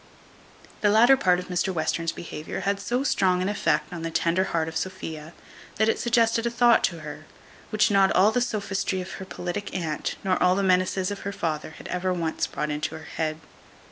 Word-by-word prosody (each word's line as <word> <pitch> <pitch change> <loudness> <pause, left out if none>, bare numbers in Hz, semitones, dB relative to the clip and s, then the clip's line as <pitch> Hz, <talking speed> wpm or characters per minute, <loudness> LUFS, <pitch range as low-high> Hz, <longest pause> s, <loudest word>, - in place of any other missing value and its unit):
The 205 - +4
latter 235 +6 +6
part 180 -8 +3
of 180 - -5
Mr 180 +1 0
Western's 165 -1 -1
behaviour 155 -2 -6
had 200 0 0
so 245 +6 -1
strong 185 -9 +2
an 185 - 0
effect 205 -2 0
on 170 - -5
the 165 - -3
tender 170 +3 +1
heart 160 -3 -1
of 160 - -6
Sophia, 160 -4 -5 0.4
that 220 - +2
it 225 - +1
suggested 230 -1 +2
a - - +1
thought 235 0 +4
to 170 -3 -4
her, 155 0 -9 0.4
which 215 -1 +2
not 195 -1 +4
all 200 +4 +5
the 245 - +1
sophistry 200 -5 -1
of 185 +1 -6
her 190 - -7
politic 185 +2 -5
aunt, 160 -5 -2
nor 185 -1 +1
all 180 0 +4
the 200 - 0
menaces 185 0 +2
of 200 - -5
her 200 - -4
father, 160 -5 -3
had - - -10
ever 180 +1 -1
once 170 -3 -1
brought 150 - -3
into 150 +1 -3
her 160 - -11
head. 155 -1 -1
185 Hz, 205 wpm, -25 LUFS, 165-205 Hz, 0.4 s, latter